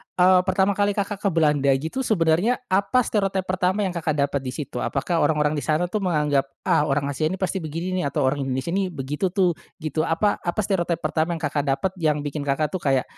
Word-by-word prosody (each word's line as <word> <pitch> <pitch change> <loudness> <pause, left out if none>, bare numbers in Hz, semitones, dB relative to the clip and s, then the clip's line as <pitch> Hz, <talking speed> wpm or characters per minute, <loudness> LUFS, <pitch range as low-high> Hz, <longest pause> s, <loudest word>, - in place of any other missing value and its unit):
eee, 185 0 +6
pertama 190 +1 +3
kali 205 0 +1
Kakak 200 0 -2
ke 200 - +1
Belanda 150 -4 +2
gitu 160 - -4
sebenarnya 190 +5 +2
apa 200 +6 +3
stereotype 195 -3 0
pertama 185 +2 0
yang 190 - -1
Kakak 160 -3 -2
dapat 140 0 0
di 130 -1 -5
situ? 140 -5 -5
Apakah 165 +7 -1
orang-orang 150 0 +2
di - - -6
sana 170 +3 0
tuh 215 - 0
menganggap, 150 -5 +1 0.2
"Ah 150 - +2
orang 140 0 0
Asia 155 +3 0
ini 185 - -2
pasti 190 0 -2
begini 165 +3 -4
nih - - -1
atau 140 - -1
orang 135 +2 +1
Indonesia 130 +5 -2
ini 195 0 0
begitu 150 +3 -3
tuh," 185 -3 +3 0.3
gitu. 155 +1 -1
Apa 185 +6 +1
apa 175 +4 -3
stereotype 175 -4 -1
pertama 160 +2 0
yang 160 - -8
Kakak 145 0 -1
dapat 140 +8 0
yang 150 -3 +1
bikin 145 0 -4
Kakak 145 +2 0
tuh 185 - -2
kayak, 135 -4 +1
165 Hz, 220 wpm, -23 LUFS, 145-190 Hz, 0.3 s, eee